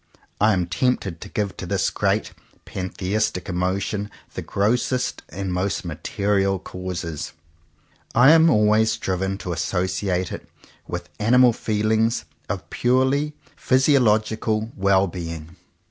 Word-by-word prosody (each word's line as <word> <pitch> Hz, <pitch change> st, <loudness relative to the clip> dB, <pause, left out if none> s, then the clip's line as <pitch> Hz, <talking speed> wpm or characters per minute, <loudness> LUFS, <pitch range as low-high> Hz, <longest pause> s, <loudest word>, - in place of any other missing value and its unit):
I 105 Hz, +1 st, +4 dB
am 90 Hz, -2 st, +1 dB
tempted 95 Hz, -3 st, -1 dB
to -, -, -8 dB
give 100 Hz, -2 st, -2 dB
to -, -, -6 dB
this -, -, +1 dB
great -, -, 0 dB, 0.3 s
pantheistic 95 Hz, +1 st, -2 dB
emotion 95 Hz, +3 st, -1 dB, 0.2 s
the -, -, -4 dB
grossest 120 Hz, +5 st, 0 dB
and 95 Hz, +2 st, -4 dB
most 95 Hz, +1 st, -1 dB
material 95 Hz, +4 st, 0 dB
causes. 90 Hz, -4 st, -5 dB, 0.8 s
I 125 Hz, +5 st, +7 dB
am 165 Hz, 0 st, +6 dB
always 110 Hz, -2 st, +3 dB
driven 95 Hz, -1 st, -2 dB
to 90 Hz, -3 st, -4 dB
associate 90 Hz, +1 st, -1 dB
it -, -, -8 dB, 0.4 s
with 85 Hz, 0 st, -5 dB
animal 120 Hz, +3 st, +5 dB
feelings 110 Hz, +2 st, 0 dB, 0.2 s
of -, -, -4 dB
purely 130 Hz, +4 st, +2 dB, 0.2 s
physiological 110 Hz, -4 st, +2 dB
well 100 Hz, 0 st, +3 dB
being. 85 Hz, -2 st, -7 dB
100 Hz, 115 wpm, -23 LUFS, 90-110 Hz, 0.8 s, I